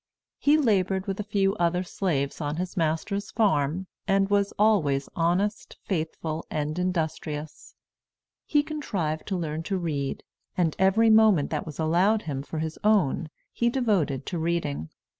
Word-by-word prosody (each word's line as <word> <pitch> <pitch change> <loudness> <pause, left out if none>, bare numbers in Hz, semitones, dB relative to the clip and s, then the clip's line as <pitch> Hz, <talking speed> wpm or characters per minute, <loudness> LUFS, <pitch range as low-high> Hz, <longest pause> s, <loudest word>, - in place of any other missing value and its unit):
He 295 +2 +4
labored 195 - +1
with 195 0 -3
a - - -1
few 195 -2 +1
other 175 0 +1
slaves 160 -7 -2
on 145 0 -2
his 180 +2 -4
master's 180 +5 -1
farm, 190 -5 +1 0.2
and 195 0 +2
was 200 0 +2
always 160 -11 +3
honest, 180 +5 0
faithful, 160 -2 -3
and 150 +3 -2
industrious. 160 -4 -3 0.7
He 295 -1 +3
contrived 190 - -3
to 190 - -1
learn 160 -2 -3
to 190 +3 -2
read, 150 -6 -3 0.3
and 170 -4 +1
every 210 +4 +4
moment 215 -9 +5
that 155 0 -2
was 150 - -7
allowed 180 +7 +2
him 140 -4 -3
for 150 +3 -7
his 160 0 -3
own 190 -7 +2 0.2
he 235 - +1
devoted 205 - 0
to 175 - -3
reading. 160 - -2
180 Hz, 150 wpm, -26 LUFS, 155-200 Hz, 0.7 s, moment